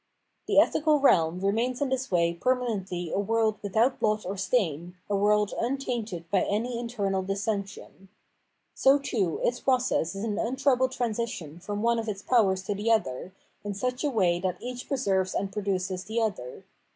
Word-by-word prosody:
The - - +1
ethical 305 -1 +3
realm 175 - +3
remains 230 +6 0
in 285 - 0
this 265 0 -2
way 170 -1 +2
permanently 195 -6 -1
a - - 0
world 220 +1 +1
without 220 +6 +1
blot 215 0 +1
or 190 +2 -3
stain, 180 - -1
a 205 - 0
world 210 +1 +2
tmtainted 235 -8 -2
by 195 - +3
any 235 +4 -1
internal 205 -5 -1
dissension. 195 -1 -4 0.6
So, 270 +1 +5
too, 215 - -1
its 245 +1 +1
process 250 -9 +1
is 195 - -4
an 215 -2 -2
untroubled 260 +1 +1
transition 225 - -3
from 205 +3 -4
one 235 0 +2
of 225 -1 -3
its 200 -1 -5
powers 195 -6 +2
to 205 +2 -2
the 205 +3 -2
other, 185 - 0 0.3
in 205 -1 -4
such 250 +6 -2
a 295 - +2
way 185 -8 +2
that 185 0 -2
each 250 0 -6
preserves 195 -9 0
and 195 -1 -2
produces 190 -2 -2
the 225 +2 -2
other. 190 - -3
210 Hz, 170 wpm, -27 LUFS, 190-245 Hz, 0.6 s, So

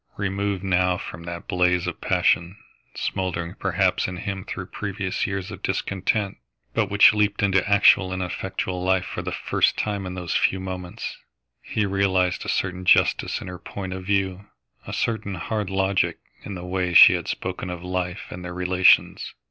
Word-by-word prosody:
Removed 100 -1 -2
now 90 -1 +2
from 85 0 -8
that 85 0 -7
blaze 90 -1 +2
of 90 - -5
passion, 85 +4 +1 0.4
smouldering 85 -2 -3
perhaps - - +1
in 90 - -5
him 95 0 -4
through 95 - -5
previous 95 0 -3
years 95 -1 -4
of - - -9
discontent, 100 +1 -1 0.4
but - - +1
which 100 0 +7
leaped 105 -1 +1
into 95 -2 +3
actual 100 -2 +5
and 95 0 -2
effective 90 +1 -3
life 90 0 +1
for - - -5
the - - -4
first - - +1
time 100 -3 -2
in 90 - -6
those 90 -2 -3
few 95 - +2
moments, 90 -1 -6 0.4
he 105 - -1
realised 95 -2 +1
a - - -5
certain 90 0 -1
justice 90 - +3
in - - -8
her 90 -1 -7
point 95 -2 -6
of 95 0 -6
view, 95 0 -1 0.4
a - - -5
certain 110 -4 -2
hard 105 +2 -3
logic 95 0 +1 0.3
in 100 - -6
the 90 0 -7
way 90 -1 -1
she - - +10
had - - -3
spoken 90 - -4
of 90 -1 -6
life 90 -1 -3
and 90 - -7
their 90 0 -6
relations. 90 0 +3
95 Hz, 175 wpm, -24 LUFS, 90-100 Hz, 0.4 s, she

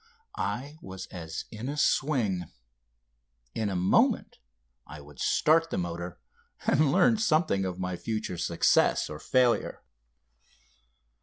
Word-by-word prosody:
I 145 +5 -4
was 95 0 -8
as 80 -2 -6
in 115 +3 -6
a 145 - -4
swing. 120 - +1 1.1
In 110 -2 -1
a 95 - -3
moment 90 +1 +2 0.5
I 75 +1 -9
would 75 -1 -15
start 165 +2 +3
the - - -3
motor 85 -1 -4 0.5
and 150 -2 +3
learn 190 - +4
something 155 - +2
of 90 -1 -4
my 90 -1 -3
future 110 -5 -4
success 85 -2 +2
or 75 - -7
failure. 125 -2 +1
100 Hz, 125 wpm, -28 LUFS, 90-145 Hz, 1.1 s, learn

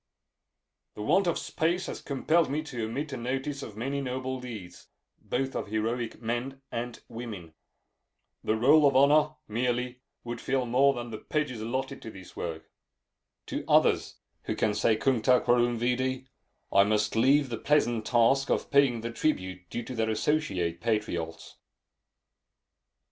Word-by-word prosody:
The 105 - -5
want 180 - +3
of 170 - +1
space 175 +3 -1
has - - -6
compelled 155 +4 +1
me 150 +3 -1
to 125 -7 -4
omit 140 +6 -4
a - - -3
notice 135 +4 -3
of 105 -5 -8
many 135 +5 -2
noble 130 0 -3
deeds, 110 -8 -9 0.3
both 135 +1 -2
of - - -3
heroic 115 +2 -2
men 120 +4 -3
and 120 0 -4
women. 105 -9 -8 0.9
The 110 - +1
roll 145 +6 +6
of 140 - +1
honor, 150 +3 +5
merely, 125 +2 -1 0.2
would 120 0 -5
fill 130 -1 0
more 135 +3 +4
than 120 -1 -5
the 110 - -5
pages 145 -7 -2
allotted 130 +4 -3
to - - -7
this 95 -4 -12
work. 80 -2 -6 0.7
To - - -4
others, - - +3 0.3
who - - -2
can 105 - +1
say 105 +1 +2
cuncta 125 0 +3
quorum 120 0 +2
vidi, 130 +2 0 0.5
I 100 - +7
must 105 +1 +1
leave 135 +4 +4
the 115 -2 -4
pleasant 120 -7 +1
task 125 +4 +3
of - - 0
paying 140 -5 +4
the 115 +1 -4
tribute 95 - -2
due 120 - -4
to 130 - -7
their 110 -2 0
associate 100 - 0
patriots. 85 -8 -2
120 Hz, 155 wpm, -28 LUFS, 110-135 Hz, 0.9 s, I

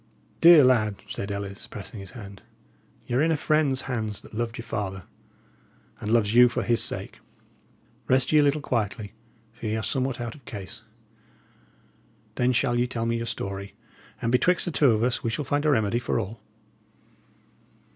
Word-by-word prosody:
"Dear 165 -3 +9
lad," 110 -6 +2
said 100 - -5
Ellis, 100 0 -6
pressing 105 +1 -8
his 100 +5 -10
hand, 100 -3 -10 0.6
"y' 125 - -5
are 125 - +3
in 165 +1 +3
a 160 - +1
friend's 145 -3 +1
hands 110 -5 -3
that - - -16
loved 115 +1 -3
your 115 - -7
father, 95 -2 -4 1.0
and 105 - -3
loves 110 -2 +3
you 125 +1 +7
for - - -2
his 120 -1 +3
sake. - - -4 0.9
Rest 130 0 +2
ye 155 - +6
a - - +6
little 145 +1 +2
quietly, 110 -5 -2 0.4
for 115 0 -7
ye 110 - -1
are 110 - -3
somewhat 130 +2 -1
out 120 -1 -4
of 150 - -16
case. 105 +1 -8 1.5
Then 125 +1 +1
shall 120 -1 +1
ye 125 - +2
tell 115 -2 -3
me 115 0 0
your 115 0 -4
story, 100 -2 -5 0.4
and 115 - -1
betwixt 170 +8 +3
the 175 - -2
two 145 -3 +4
of 110 -1 +2
us 125 0 0
we 115 - 0
shall 140 +6 -3
find 145 +3 0
a - - +4
remedy 110 -4 +2
for 120 - -1
all." 105 +2 -6
115 Hz, 185 wpm, -26 LUFS, 105-130 Hz, 1.5 s, Dear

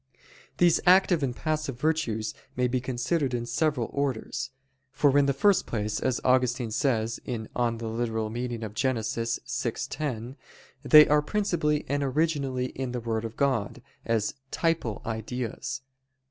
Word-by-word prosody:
These 175 -2 +5
active 180 -2 +5
and 130 -3 -1
passive 155 -5 -2
virtues 125 -8 0 0.2
may 125 0 +2
be 125 0 -1
considered 130 +2 -1
in 120 -1 -2
several 125 0 0
orders. 140 -5 -2 0.4
For 140 0 +3
in 145 -1 +5
the - - +4
first 195 +9 +3
place, 105 -2 -2
as 130 -1 0
Augustine 125 -2 +2
says 115 -2 0
(Gen. 115 -3 -4
ad 120 -2 0
lit. 115 +1 -2
vi, 115 +1 -2 0.3
10), 120 +4 -8 0.5
they 150 +2 +9
are 150 0 +4
principally 150 -4 0
and 145 +1 0
originally 140 -2 0
in 130 -2 -4
the 125 - -2
Word 115 -1 -2
of 115 0 -6
God, 130 -8 0 0.2
as 115 -2 0 0.2
_typal 165 -10 -1
ideas. 115 +3 -4
125 Hz, 135 wpm, -27 LUFS, 115-145 Hz, 0.5 s, they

